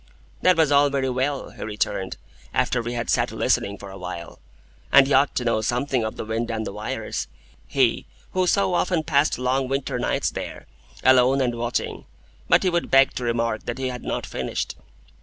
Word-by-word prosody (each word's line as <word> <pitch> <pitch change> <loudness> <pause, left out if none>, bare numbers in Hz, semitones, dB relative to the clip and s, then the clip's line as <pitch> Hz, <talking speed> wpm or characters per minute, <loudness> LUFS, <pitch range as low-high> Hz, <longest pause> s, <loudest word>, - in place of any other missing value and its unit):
That 185 -2 +4
was 160 -3 +3
all 145 0 +5
very 135 -2 0
well, 135 +2 -2
he - - -13
returned, 105 -3 -2 0.4
after 120 - +1
we 120 +1 -4
had 120 -1 -3
sat - - +1
listening 100 0 0
for 100 0 -10
a 95 - -10
while, 85 -2 -7 0.5
and 140 - +8
he 140 - 0
ought 140 +2 +4
to 125 - -1
know 115 -2 +2
something 125 +1 0
of 110 - -3
the - - -5
wind 115 +2 -2
and 110 -1 -2
the - - -5
wires,—he - - -2 0.2
who 185 -1 +1
so 195 0 +2
often 175 -2 +1
passed 150 -1 +2
long 130 +1 0
winter 135 +1 -2
nights - - 0
there, - - -6 0.4
alone 130 +1 +5
and 125 -3 +1
watching. 120 +1 -3 0.4
But - - +5
he 185 - +3
would 170 0 0
beg 135 0 +5
to 125 - -4
remark 115 -2 -1
that 120 - -3
he 130 -1 -2
had 125 -1 -6
not - - -3
finished. - - -3
125 Hz, 195 wpm, -24 LUFS, 110-140 Hz, 0.5 s, and